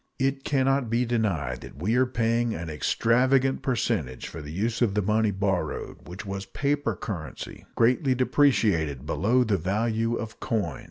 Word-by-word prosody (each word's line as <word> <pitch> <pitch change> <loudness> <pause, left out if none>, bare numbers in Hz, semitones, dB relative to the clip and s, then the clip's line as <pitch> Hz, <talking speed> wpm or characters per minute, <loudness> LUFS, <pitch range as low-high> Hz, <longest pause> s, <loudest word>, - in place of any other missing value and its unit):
It 135 0 0
can 135 -3 +1
not 135 -3 +2
be 120 +2 +1
denied 100 - -1
that - - -11
we 100 +8 0
are 130 +1 +4
paying 115 -1 0
an 80 -1 -5
extravagant 130 - +2
percentage 115 - -1
for 80 - -7
the 75 0 -8
use 110 +8 -1
of 110 -5 +2
the 105 - +2
money 110 +2 +2
borrowed, 95 -4 -2
which 90 +3 -8
was 95 0 -5
paper 145 +7 -1
currency, 95 -12 -7
greatly 130 +3 +3
depreciated 105 - +2
below 105 - +2
the 105 -5 +1
value 110 +6 0
of 115 -1 -6
coin. 100 -10 -2
115 Hz, 165 wpm, -26 LUFS, 95-125 Hz, -, are